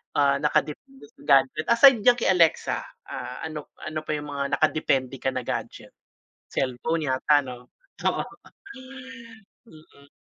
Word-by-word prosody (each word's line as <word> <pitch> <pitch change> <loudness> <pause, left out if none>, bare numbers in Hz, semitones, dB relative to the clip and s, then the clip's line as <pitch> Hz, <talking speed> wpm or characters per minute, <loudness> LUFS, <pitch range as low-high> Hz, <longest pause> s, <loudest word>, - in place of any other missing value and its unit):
ah, 140 -1 +3
nakadepende 220 - -3
sa 265 - -33
gadget 135 +3 +3
aside 235 +1 +6
diyan 245 +4 +5
kay 235 -5 +1
Alexa, 170 -3 +2 0.2
ah, 125 - -7
ano 155 -2 -6 0.2
ano 155 0 -4
pa 155 - -1
yung 150 -1 -6
mga 140 0 -1
nakadepende 135 -4 0
ka - - -4
na 130 - -2
gadget? - - -6 0.5
Cellphone 145 +4 -2
yata 145 +3 +3
'no? 125 -2 -11 0.3
Oo. - - +1 1.5
Mm. 155 -6 -19
150 Hz, 135 wpm, -25 LUFS, 135-165 Hz, 1.5 s, aside